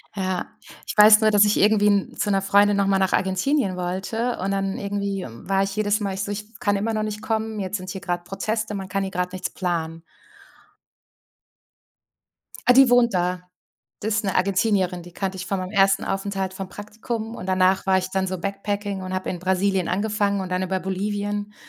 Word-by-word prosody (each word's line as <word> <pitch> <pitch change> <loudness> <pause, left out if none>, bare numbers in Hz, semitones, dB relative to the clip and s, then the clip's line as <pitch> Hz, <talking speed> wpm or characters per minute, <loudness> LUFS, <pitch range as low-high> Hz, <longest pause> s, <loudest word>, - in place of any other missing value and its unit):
Ja, 185 -2 -2 0.4
ich - - -6
weiß 210 +1 +8
nur, 215 0 +4
dass 205 0 +6
ich 210 - +2
irgendwie 210 0 +4
'n 200 -1 +1
zu 205 - -1
'ner 195 0 +2
Freundin 200 +1 +4
nochmal 195 -1 +2
nach 190 -1 +1
Argentinien 190 +3 +1
wollte 190 +7 -2
und 195 +2 -1
dann 195 0 -1
irgendwie 200 -1 -3
war 195 +12 -1
ich 195 0 -4
jedes 215 0 +1
Mal 200 -2 -2
ich 195 +1 -3
so: 205 - -4
„Ich 205 +1 -4
f 220 +2 -19
kann 205 -1 +1
immer 220 +3 -1
noch 215 0 -1
nicht 210 0 -4
kommen, 220 0 -2
jetzt 195 +1 -2
sind 185 0 -8
hier 190 +1 -6
grad 175 -1 -3
Proteste, 215 +3 -3
man 190 -2 -5
kann 195 +1 -1
hier 190 - -4
grad 180 0 -2
nichts 185 0 -3
planen.“ 165 -3 -3 2.7
Ah, 250 - +9
die 270 0 +7
wohnt 245 -2 +4
da. 180 0 -1 0.5
Das 215 +1 -1
ist 215 - 0
'ne 195 - -1
Argentinierin. 190 -1 +1
Die 175 0 -13
kannte 190 0 -3
ich 185 - -5
von 195 - -1
meinem 185 0 -5
ersten 195 -1 +3
Aufenthalt 195 -1 -2
vom 190 0 -6
Praktikum. 220 +3 -6
Und - - -7
danach 185 +1 +2
war 190 0 +4
ich 185 - -3
dann 190 0 0
so 185 0 -3
backpacking 200 +1 -3
und 185 - -5
habe 185 0 -2
in 180 - -4
Brasilien 190 0 +1
angefangen 200 0 0
und 185 - -5
dann 180 0 0
über 185 0 -1
Bolivien. 205 +2 -3
195 Hz, 210 wpm, -23 LUFS, 185-210 Hz, 2.7 s, Ah